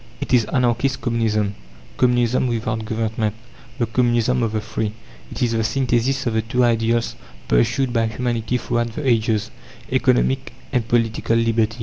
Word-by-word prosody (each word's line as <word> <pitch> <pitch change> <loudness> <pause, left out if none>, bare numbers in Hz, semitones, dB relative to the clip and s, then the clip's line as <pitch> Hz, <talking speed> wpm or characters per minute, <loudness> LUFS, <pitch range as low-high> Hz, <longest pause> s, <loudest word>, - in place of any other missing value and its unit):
It - - -3
is 120 -3 +5
Anarchist 125 +1 +1
Communism, 110 -4 0 0.4
Communism 125 0 +2
without 110 -2 -2
government 110 -1 -1 0.4
the 120 - +1
Communism 120 +1 +1
of 115 -2 0
the 110 - 0
Free. 105 0 -3 0.4
It - - -2
is 120 - +1
the 115 -1 +1
synthesis 130 +2 0
of 120 - 0
the 110 - +2
two 120 +3 0
ideals 115 0 +1 0.3
pursued 120 - +2
by 115 -1 +2
humanity 120 +1 -1
throughout 120 -1 -2
the 150 - -3
ages 110 -2 +1 0.4
Economic 60 +2 +1 0.2
and 120 -3 0
Political 115 -1 +1
Liberty. 115 0 +1
115 Hz, 150 wpm, -21 LUFS, 110-120 Hz, 0.4 s, is